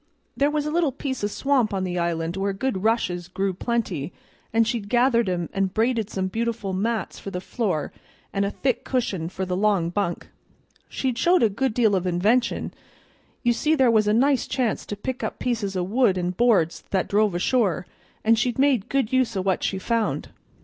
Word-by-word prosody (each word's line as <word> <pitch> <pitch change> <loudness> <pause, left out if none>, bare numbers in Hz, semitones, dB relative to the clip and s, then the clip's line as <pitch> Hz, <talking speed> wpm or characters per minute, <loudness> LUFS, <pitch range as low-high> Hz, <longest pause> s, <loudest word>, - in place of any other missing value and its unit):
There 285 +1 +2
was 300 0 -1
a 300 - -2
little 330 -3 +2
piece 260 -2 -4
o' - - +2
swamp 250 -1 +1
on 190 - -1
the 180 -1 -2
island 170 0 -1
where 195 +1 -1
good 195 -1 -2
rushes 180 -6 0
grew 190 +1 -1
plenty, 200 - -2 0.4
and 225 0 +3
she'd 225 -4 -2
gathered 240 -3 +3
'em, 175 -2 -1
and 195 -1 -1
braided 225 -1 +1
some 190 -3 -2
beautiful 225 -1 -2
mats 215 +1 -2
for - - -6
the 180 - -4
floor 185 - -2 0.4
and 200 - +1
a 200 - 0
thick 250 +3 -1
cushion 195 -10 -1
for 190 +1 -4
the 180 0 -2
long 195 -4 +1
bunk. 180 -2 -2 0.6
She'd 255 -3 -2
showed 350 -3 +4
a 225 - +5
good 230 +3 -1
deal 220 -5 +3
of 185 -1 -1
invention; 215 +8 +1 0.7
you 240 -1 +3
see 310 +6 +1
there 260 -5 +4
was 215 -2 +3
a - - +4
nice 265 +3 +3
chance 245 -5 -1
to 205 - -4
pick 250 +5 -5
up - - -3
pieces 215 -6 -2
o' 180 - 0
wood 205 0 +2
and 180 0 -2
boards 200 -8 +2
that 190 -2 0
drove 205 -2 +2
ashore, 185 -1 +1 0.4
and 225 0 +4
she'd 240 0 0
made 265 -6 +2
good 270 -4 0
use 250 -5 +2
o' - - +1
what 190 -1 +1
she 190 - -1
found. 225 +3 -1
215 Hz, 200 wpm, -24 LUFS, 190-245 Hz, 0.7 s, a